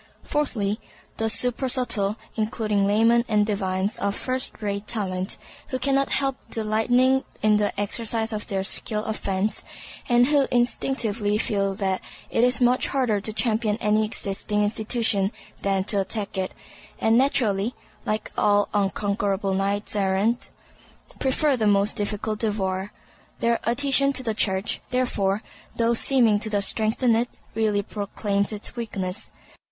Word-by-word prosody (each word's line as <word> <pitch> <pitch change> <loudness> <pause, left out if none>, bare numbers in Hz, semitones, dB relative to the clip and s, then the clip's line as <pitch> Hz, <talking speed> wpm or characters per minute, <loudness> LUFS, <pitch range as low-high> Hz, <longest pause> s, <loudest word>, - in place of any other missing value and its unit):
Fourthly, 225 -8 -1 0.4
the 225 - 0
supersubtle, 245 -4 +1 0.2
including 215 -2 0
laymen 230 +3 +4
and 210 -1 +3
divines 195 -1 -1
of 200 0 -1
first 255 0 -1
rate 205 -1 -3
talent; 190 -4 -2 0.3
who 260 - -2
cannot 275 +1 +2
help 270 -1 +1
delighting 245 +4 +2 0.2
in 215 -1 +4
the 205 -1 -1
exercise 225 +2 -1
of 210 -1 -4
their 195 -1 -2
skill 210 +2 0
of 220 - -2
fence, 195 +1 -2 0.5
and 240 0 +5
who 285 0 +3
instinctively 235 -4 +1
feel 195 -3 0
that 190 -2 -1 0.3
it 230 - +2
is 250 +1 +3
much 250 0 +3
harder 240 -7 0
to 215 - -3
champion 215 -1 0
any 215 -1 +2
existing 210 0 -2
institution 215 -1 +1 0.3
than 195 -1 +1
to 200 0 +1
attack 205 +1 -3
it, 190 -1 -1 0.5
and 225 0 +3
naturally 235 -4 +2 0.3
(like 215 0 -2
all 205 -1 +3
unconquerable 200 -1 0
knights 200 +2 -1
errant) 200 +4 0 0.7
prefer 275 +2 +2
the 220 -4 +1
most 200 0 +3
difficult 210 +1 -2
devoir. 195 -3 -2 0.5
Their 235 0 +1
adhesion 275 +2 +4
to 260 - +2
the 225 -3 0
Church, 190 -1 0
therefore, 215 -6 0 0.3
though 230 0 +2
seeming 235 -3 +4
to 210 -2 +1
strengthen 225 +3 +1
it, 240 +2 +1 0.2
really 210 -2 +1
proclaims 200 0 -2
its 210 +2 -6
weakness. 200 -5 -4
215 Hz, 135 wpm, -24 LUFS, 200-235 Hz, 0.7 s, and